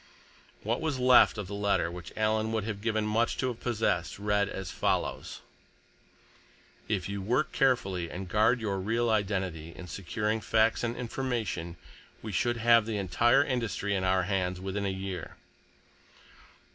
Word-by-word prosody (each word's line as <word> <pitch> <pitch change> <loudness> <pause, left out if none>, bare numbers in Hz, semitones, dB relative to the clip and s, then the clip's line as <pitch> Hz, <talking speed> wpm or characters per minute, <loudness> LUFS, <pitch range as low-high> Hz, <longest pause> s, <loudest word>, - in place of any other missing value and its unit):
What 115 +6 -1
was 160 -4 -1
left 125 -2 +6
of 105 - -3
the 100 - -8
letter 100 -4 +1
which 90 -1 -8
Alan 110 0 +1
would 110 -2 0
have 105 -2 -4
given 110 -1 0
much 115 +2 +1
to 130 - 0
have 120 - -6
possessed, 105 -7 -1
read 105 0 +1
as 95 -3 -5
follows: - - -2 1.5
"_—If 95 -5 -1
you 100 0 -4
work 125 +10 0
carefully 95 -10 +1
and 95 +1 -6
guard 110 +6 +3
your 100 -4 -2
real 115 +4 0
identity 95 -6 -1
in 90 - -9
securing 105 +5 -2
facts 110 +2 +2
and 120 0 -1
information, 115 -9 -3 0.5
we 110 - -5
should 120 +5 0
have 115 -1 +4
the 110 -2 -2
entire 100 +8 +3
industry 115 -6 -2
in 95 -1 0
our 95 0 +2
hands 90 -1 -1
within 95 +2 -3
a - - 0
year_." 95 -3 -5
105 Hz, 160 wpm, -29 LUFS, 95-115 Hz, 1.5 s, left